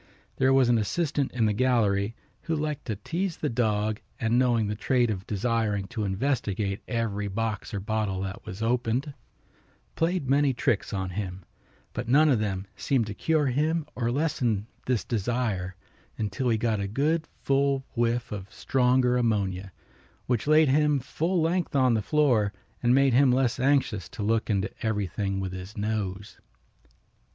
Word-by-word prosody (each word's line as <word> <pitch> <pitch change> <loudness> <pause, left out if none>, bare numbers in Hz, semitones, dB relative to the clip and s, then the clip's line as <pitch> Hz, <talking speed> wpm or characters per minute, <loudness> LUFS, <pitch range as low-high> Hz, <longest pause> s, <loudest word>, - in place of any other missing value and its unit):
There 130 0 +3
was 135 -2 +5
an 120 -1 +4
assistant 145 +5 -1
in 120 -3 +1
the 105 - +2
gallery 110 -3 +1 0.3
who 165 - -2
liked 150 -1 -3
to 110 - -2
tease 170 - -3
the 150 - -1
dog 110 -2 0 0.2
and 115 0 +2
knowing 120 -3 +3
the 105 - -1
trait 120 +2 +1
of 95 -2 -5
desiring 105 -1 0
to 115 -4 -3
investigate 100 -2 -1
every 110 -4 -1
box 105 +1 -3
or 100 - -3
bottle 105 -2 -1
that 95 0 -5
was 110 0 -6
opened, 120 +4 0 0.8
played 165 -3 0
many 140 0 +3
tricks 110 -3 0
on 95 -2 -2
him, 95 -1 -5 0.5
but 120 0 -4
none 150 +5 +5
of 125 -6 +3
them 95 -2 -2
seemed 130 -5 +1
to 105 - -5
cure 155 +8 +1
him 150 +5 +1
or 120 -2 -2
to - - +1
lessen 125 -7 0 0.2
this 125 -4 +1
desire 105 -5 -1 0.4
until 110 +4 -1
he 115 - +2
got 110 -1 0
a 100 - -2
good 155 +9 0 0.2
full 140 -1 +1
whiff 120 0 0
of 100 -2 -6
stronger 125 -1 +2
ammonia, 100 -5 0 0.5
which 125 +1 -1
laid 155 0 +6
him 150 +1 +3
full 165 +7 -1
length 170 -1 0
on 130 -3 +4
the 110 - +1
floor 120 -6 +2 0.3
and 120 +1 +4
made 135 -1 +4
him 130 +1 +5
less 130 -1 +1
anxious 130 - +1
to 125 -5 -6
look 115 +2 +1
into 100 -2 0
everything 100 -2 -1
with 95 -1 -3
his 95 +4 -8
nose. 105 -2 -3
115 Hz, 165 wpm, -27 LUFS, 105-135 Hz, 0.8 s, laid